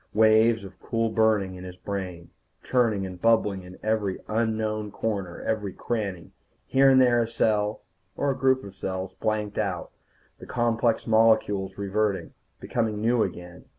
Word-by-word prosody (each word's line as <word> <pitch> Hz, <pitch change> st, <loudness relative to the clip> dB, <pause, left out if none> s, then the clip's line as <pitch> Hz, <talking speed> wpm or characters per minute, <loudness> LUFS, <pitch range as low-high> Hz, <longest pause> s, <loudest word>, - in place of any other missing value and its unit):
Waves 110 Hz, +1 st, +5 dB
of 95 Hz, -1 st, -11 dB
cool 115 Hz, -1 st, -1 dB
burning 110 Hz, -4 st, +2 dB
in 90 Hz, 0 st, -9 dB
his 90 Hz, -1 st, -8 dB
brain, 95 Hz, -3 st, -6 dB, 0.3 s
churning 115 Hz, -6 st, +1 dB
and 90 Hz, -1 st, -8 dB
bubbling 110 Hz, -4 st, +2 dB
in 90 Hz, 0 st, -12 dB
every 105 Hz, -3 st, 0 dB
unknown 110 Hz, -1 st, -1 dB
corner, 100 Hz, -5 st, -4 dB
every 105 Hz, -4 st, -2 dB
cranny. 100 Hz, -7 st, -4 dB, 0.3 s
Here 135 Hz, +1 st, +4 dB
and 130 Hz, -1 st, +6 dB
there 120 Hz, -2 st, +4 dB
a 115 Hz, -, 0 dB
cell, 110 Hz, -2 st, 0 dB, 0.3 s
or 140 Hz, -, +1 dB
a -, -, -2 dB
group 130 Hz, 0 st, +2 dB
of 100 Hz, -1 st, -10 dB
cells, 95 Hz, 0 st, -4 dB
blanked 105 Hz, -1 st, -2 dB
out, 95 Hz, -5 st, -2 dB, 0.5 s
the -, -, -11 dB
complex 120 Hz, -1 st, +1 dB
molecules 110 Hz, -4 st, +2 dB
reverting, 100 Hz, 0 st, -1 dB, 0.3 s
becoming 110 Hz, -3 st, -1 dB
new 115 Hz, +2 st, +2 dB
again. 90 Hz, -2 st, -5 dB
110 Hz, 150 wpm, -26 LUFS, 95-115 Hz, 0.5 s, and